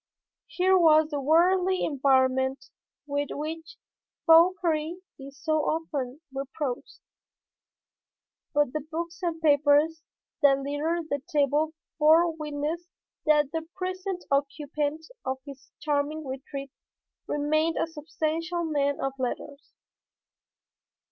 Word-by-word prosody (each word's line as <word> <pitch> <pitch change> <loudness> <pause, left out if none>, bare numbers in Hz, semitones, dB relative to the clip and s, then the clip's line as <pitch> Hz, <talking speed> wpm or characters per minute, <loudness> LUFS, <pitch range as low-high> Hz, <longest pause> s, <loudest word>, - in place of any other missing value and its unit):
Here 375 +1 +2
was 315 -2 +5
the 290 -1 -2
worldly 360 +5 +3
environment 265 -1 +1 0.3
with 285 0 -1
which 320 +7 -6 0.5
Fauchery 330 -1 +4 0.2
is 275 0 -10
so 310 -2 +1
often 300 -4 -2
reproached. 270 -1 -5 1.5
But 290 -3 +1
the 305 - -1
books 335 +4 -6
and 340 -2 -2
papers 300 +1 +3 0.4
that 275 -1 +6
littered 305 +4 -2
the 285 -1 0
table 295 +2 +2 0.2
bore 325 +2 +5
witness 305 +2 -4 0.4
that 300 -2 +4
the 325 0 -4
present 370 0 -4
occupant 290 +2 -1 0.2
of 260 0 -2
this 280 -1 -12
charming 300 +1 -1
retreat 275 +1 -6 0.6
remained 310 +3 +1
a - - +2
substantial 325 +2 -3
man 285 -3 0
of 270 0 -2
letters. 280 +3 -4
305 Hz, 105 wpm, -27 LUFS, 285-325 Hz, 1.5 s, that